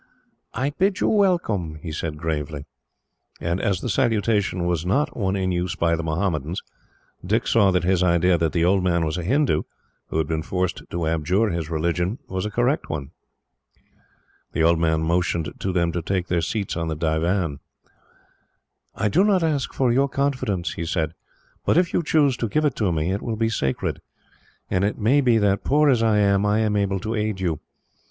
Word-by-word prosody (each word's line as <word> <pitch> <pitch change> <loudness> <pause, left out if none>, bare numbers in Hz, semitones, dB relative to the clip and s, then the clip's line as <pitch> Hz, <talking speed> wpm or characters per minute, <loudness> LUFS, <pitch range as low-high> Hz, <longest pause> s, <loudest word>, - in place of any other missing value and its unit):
"I 135 +4 0
bid 190 +5 0
you - - +2
welcome," 170 - +1
he 80 +1 -7
said 75 0 -4
gravely. 75 -2 -3 0.7
And 85 +2 -1
as 95 -3 0
the - - -3
salutation 105 -6 +1
was 85 -2 0
not 135 +12 0
one 95 -3 -1
in 95 -1 0
use 90 0 -1
by 85 0 +1
the 85 - -3
Mohammedans, 80 0 -2 0.6
Dick 110 +6 0
saw 105 -4 +4
that 90 -2 +1
his 90 0 +2
idea 90 0 +3
that 80 -2 0
the 85 -1 +1
old 95 +1 +3
man 85 -2 +1
was 80 +3 -2
a - - -4
Hindoo, 135 - +2 0.5
who - - -3
had 80 - +1
been 80 0 -2
forced 90 +2 -2
to 85 -1 -2
abjure 90 +7 +1
his 85 -2 -3
religion, 85 +6 -1
was 95 +2 -3
a - - -3
correct 120 +7 0
one. 70 -2 -4 1.4
The 80 - +1
old 85 0 +4
man 80 -1 +1
motioned 85 -2 0
to 95 - -1
them 85 -2 +1
to 85 - -2
take 90 +1 -2
their 85 -1 +1
seats 100 +4 -2
on 85 -1 -2
the 80 - -2
divan. 80 0 0 1.4
"I - - 0
do 180 - +3
not 195 -4 +3
ask 150 -4 0
for 130 -3 +1
your 135 +2 +2
confidence," 125 - -1
he 85 - -4
said, 80 -1 -1 0.5
"but - - +2
if 175 -1 +2
you - - +2
choose 150 -4 +2
to 115 - -1
give 155 +7 +1
it 145 - +1
to 100 -5 +1
me, 80 +2 0
it 100 - -2
will 115 -2 -3
be 115 0 0
sacred, 70 -12 -2 0.7
and 90 - 0
it 100 - 0
may 125 +7 +3
be 120 -4 +3
that, 100 -2 +1
poor 150 +1 +4
as 120 -3 +2
I 110 -2 +3
am, 100 -1 +3
I 105 +1 +2
am 105 -1 +1
able 100 -1 0
to 110 +1 -3
aid 105 -3 -1
you. 85 -5 -1
95 Hz, 200 wpm, -23 LUFS, 85-115 Hz, 1.4 s, saw